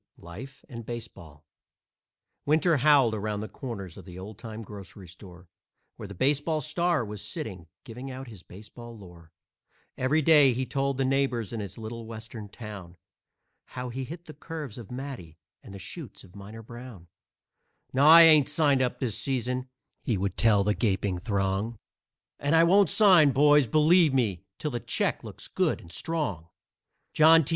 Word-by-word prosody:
LIFE 110 +12 -11
AND 115 -2 -8
BASEBALL 85 -10 -9 1.0
Winter 155 +2 +2
howled 135 -4 +4
around 105 -1 -3
the 110 - -5
corners 100 - -8
of - - -11
the 90 -2 -11
old 100 +2 -9
time 115 -1 -8
grocery 100 -2 -11
store, 90 0 -14 0.5
Where 105 - -9
the 100 - -10
baseball 145 - +1
star 170 -2 0
was 105 -1 -7
sitting, 95 -4 -5 0.2
giving 125 +3 -8
out 130 0 -8
his 105 -6 -11
baseball 110 +5 -12
lore. 85 -5 -15 0.7
Every 145 +5 +1
day 145 -4 +6
he 130 +2 -2
told 135 0 -2
the 135 - 0
neighbors 130 -5 0
in 115 - -4
his 100 -4 -7
little 115 0 -7
Western 110 -1 -9
town 100 -5 -10 0.7
How 125 0 -7
he 130 +2 -5
hit 165 +6 -9
the 155 - -10
curves 150 -6 -8
of 115 - -11
Matty 125 - -8 0.2
and - - -13
the 100 - -8
shoots 120 - -9
of 95 0 -18
Miner 105 +3 -10
Brown. 120 -6 -11 0.9
"No, 135 +3 +4
I 165 +1 +10
ain't 155 -4 +6
signed 145 -3 +2
up 125 -1 -1
this 120 -5 -1
season," 125 -1 -2 0.3
he 115 -6 -1
would 95 0 -2
tell 105 -3 +3
the 105 +1 +1
gaping 95 -4 -1
throng, 100 +2 -2 0.6
"And 145 +3 +1
I 165 - +6
won't 190 +1 +4
sign 180 -10 +5
boys, 145 0 +5
believe 155 +2 +4
me, 100 -8 0
till 150 - -3
the 120 - -3
check 115 0 -1
looks - - -8
good - - 0
and 85 - -14
strong. 100 - -3 0.7
John 160 0 +6
T. - - -3
120 Hz, 170 wpm, -27 LUFS, 100-140 Hz, 1.0 s, I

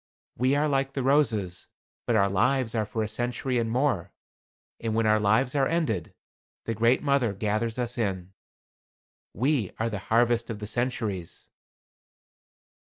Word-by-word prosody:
We 130 +4 +2
are 150 +1 +2
like 135 -1 0
the 135 - -2
roses, 110 -11 +1 0.4
but 120 - +2
our 100 -2 +4
lives 120 +5 +1
are 110 -3 0
for 110 +1 -2
a - - -2
century 120 +3 -2
and 115 -1 -1
more. 115 - 0 0.7
And 115 -1 -2
when 115 0 +2
our 110 0 +4
lives 110 +5 +2
are 135 -2 +2
ended, 125 - -1 0.5
the 115 - -1
Great 115 +5 +2
Mother 140 -7 +2
gathers 110 +3 -1
us 120 -1 -2
in. 95 -4 -2 1.0
We 125 - +1
are 115 +1 -1
the 100 - -3
harvest 120 +1 +2
of 115 - -4
the 105 - -6
centuries." 110 -6 -3
115 Hz, 155 wpm, -27 LUFS, 105-130 Hz, 1.0 s, our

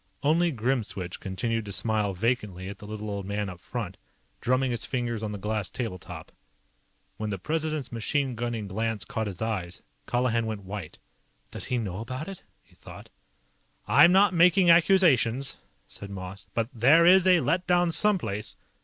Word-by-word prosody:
Only 165 +4 +3
Grimswitch 110 - -2
continued 115 +4 -2
to 100 - -6
smile 105 -1 0
vacantly 105 -4 -1
at 100 - -9
the 105 - -10
little 105 0 -6
old 100 -1 -3
man 100 0 -2
up 90 -2 -9
front, 100 -1 -5 0.4
drumming 130 +1 +1
his 120 -1 -2
fingers 120 -4 -2
on 110 -1 -3
the 105 - -5
glass 105 0 -2
table 115 -7 -4
top. - - -10 0.9
When 110 -1 -3
the 100 - -2
President's 155 - -2
machine 130 +3 -1
gunning 115 -2 -3
glance 110 +2 -2
caught 110 -5 -3
his 100 +1 -5
eyes, 95 -6 -4 0.2
Colihan 120 -2 +1
went 110 -2 -4
white. 95 -4 -7 0.5
Does - - -4
he 125 - -1
know 100 -5 -3
about 130 +6 -5
it? 195 -2 -8 0.2
he - - -27
thought. - - -13 0.8
"I'm 170 - +7
not 195 +1 +5
making 180 +1 +5
accusations," 160 - +4 0.3
said 100 - -9
Moss. 95 0 -8
"But 115 0 0
there 135 +8 +5
is 185 +1 +6
a 180 -2 +6
let 180 +4 0
down 175 -1 +3
someplace. 160 - 0
115 Hz, 170 wpm, -27 LUFS, 105-145 Hz, 0.9 s, I'm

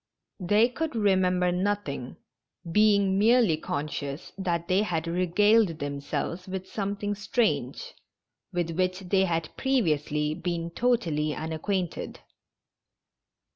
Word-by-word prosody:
They 205 +5 +4
could 295 +3 -4
remember 185 -4 +2
nothing, 180 -9 -2 0.5
being 200 -1 +4
merely 225 -5 +4
conscious 145 0 -5
that 175 -3 -2
they 185 +2 +3
had 170 -6 -1
regaled 185 +2 +3
themselves 145 +5 -4
with 190 0 -5
some 200 0 -3
thing 205 0 -2
strange, 225 - -1 0.6
with 175 -2 -1
which 185 +2 -1
they 190 +1 +2
had 165 -3 -2
previously 155 - +1
been 170 0 -3
totally 165 -10 0
unacquainted. 165 +3 -3
185 Hz, 105 wpm, -27 LUFS, 165-205 Hz, 0.6 s, They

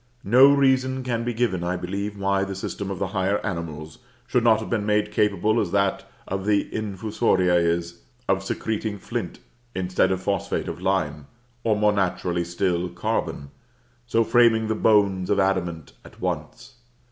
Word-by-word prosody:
No 130 +7 +7
reason 130 -2 +2
can 120 -2 -2
be 120 - -1
given, 115 -7 -1
I 90 +1 -1
believe, 100 +3 -4
why 100 0 +1
the 95 0 -4
system 95 +1 -5
of 95 - -4
the 95 0 -2
higher 95 +1 0
animals 80 -5 -5 0.3
should 125 -1 +1
not 110 -2 +5
have 110 - -6
been 110 -3 -1
made 105 0 +1
capable, 105 +2 +2
as 100 - -2
that 100 -1 0 0.2
of 95 +1 -3
the 105 -1 +1
Infusoria 105 -3 0
is, 85 0 0 0.3
of 95 0 +1
secreting 110 +1 -3
flint, 115 -1 -5 0.4
instead 95 0 +1
of 95 - 0
phosphate 100 -1 -1
of - - -6
lime, 75 -7 -1 0.4
or 110 -2 +2
more 105 0 +3
naturally 90 -3 0
still, 85 0 -1
carbon; 70 -4 -3 0.6
so 115 -1 +2
framing 115 -1 +3
the - - +2
bones 100 -4 +2
of 100 - +2
adamant 90 -5 -1
at - - -16
once. - - -5
100 Hz, 165 wpm, -24 LUFS, 90-110 Hz, 0.6 s, No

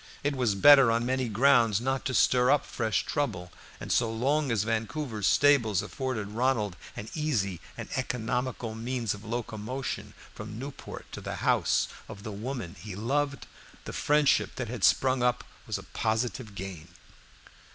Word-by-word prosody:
It 145 0 0
was 120 -6 +1
better 135 +4 +8
on 115 +1 +1
many 130 -1 0
grounds 115 -2 +4
not 135 +2 -1
to 130 - -1
stir 125 0 +4
up 145 0 +3
fresh 110 -4 -1
trouble, 90 - -2 0.3
and - - -6
so 115 -2 +2
long 135 +5 +1
as 110 -3 +1
Vancouver's 115 0 -2
stables 120 -9 +4
afforded 115 -2 -3
Ronald 115 -4 0 0.2
an 105 - -6
easy 110 - -1 0.2
and - - -6
economical 125 -1 -2
means 115 -1 -2
of 105 0 -10
locomotion 115 +2 -4 0.2
from 105 0 -8
Newport 135 +3 -8
to - - -7
the - - -5
house - - +3 0.2
of 100 - -9
the 110 - -5
woman 110 -3 -5
he 105 -3 -7
loved, 140 +6 -1 0.4
the - - -6
friendship 150 -1 +2
that 125 -4 -4
had 115 -4 -5
sprung 130 +6 +4
up 125 0 +1 0.2
was - - -1
a - - -9
positive 110 -1 -2
gain. 95 -4 -7
120 Hz, 160 wpm, -28 LUFS, 105-130 Hz, 0.4 s, better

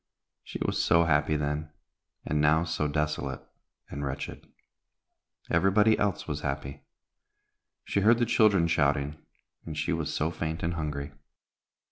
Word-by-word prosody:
She - - -7
was - - 0
so 85 0 +4
happy 75 -1 +2
then, 75 +1 -2 0.6
and 75 0 0
now 75 +2 +4
so 80 -2 -1
desolate 75 0 -2 0.4
and 70 - -6
wretched. 70 0 -5 1.0
Everybody 105 +3 +4
else 100 -2 -1
was 75 -1 -3
happy; 70 0 -4 1.0
she - - 0
heard 115 +4 +5
the 120 - +2
children 105 -7 +4
shouting, 75 -1 +1 0.4
and 80 -1 -7
she - - 0
was - - -2
so 80 +2 -1
faint 80 -1 -4
and 85 +1 0
hungry. 75 -3 -4
75 Hz, 135 wpm, -28 LUFS, 75-85 Hz, 1.0 s, heard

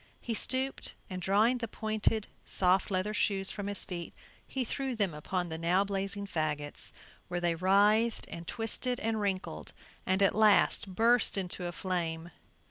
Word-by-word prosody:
He 235 - -3
stooped 260 +4 0 0.2
and 185 0 -4
drawing 215 +7 +3
the 230 - -3
pointed 215 0 -1 0.2
soft 185 +2 +2
leather 195 +2 -1
shoes 195 -3 +1
from 200 -1 -5
his 205 -1 -2
feet, 175 -2 -6 0.3
he 265 -2 -2
threw 265 +1 -3
them 200 -6 0
upon 175 +4 -3
the 160 0 -4
now 175 +4 +3
blazing 200 0 -2
fagots, 150 -5 -2 0.4
where 175 0 -2
they 175 -1 +1
writhed 205 +6 +3
and 170 0 -8
twisted 245 +2 +1
and 220 -1 -1
wrinkled, 185 - -3 0.3
and 190 +2 +2
at 195 - +4
last 215 -1 +4
burst 230 +1 +4
into 180 -1 -2
a - - -3
flame. 170 -2 -3
195 Hz, 160 wpm, -31 LUFS, 175-220 Hz, 0.4 s, at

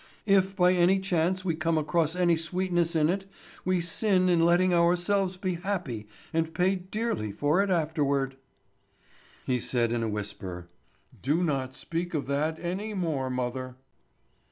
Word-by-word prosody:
If 195 -1 +3
by 180 0 +4
any 180 +2 +4
chance 185 0 0
we 170 - +1
come 160 +1 0
across 160 +1 +1
any 175 -2 +3
sweetness 175 0 -1
in 155 -1 +4
it, 190 +3 -1 0.4
we 185 -1 +1
sin 185 +2 +2
in 170 -2 +4
letting 175 +2 +4
ourselves 180 +2 +2
be 185 -1 -2
happy, 170 - -4 0.3
and 165 0 -1
pay 185 +1 +3
dearly 190 - -3
for 145 - +2
it 200 - 0
afterward." 145 -6 0 1.1
He 125 -1 +1
said 120 -1 0
in 120 -1 0
a 115 - -1
whisper: 100 -4 -5 0.6
"Do 155 +7 +1
not 135 -5 -1
speak 165 +4 -3
of 145 - -1
that 150 +3 -1
any 195 +5 -4
more, 155 -8 -1
mother." 130 0 -3
170 Hz, 155 wpm, -28 LUFS, 140-185 Hz, 1.1 s, by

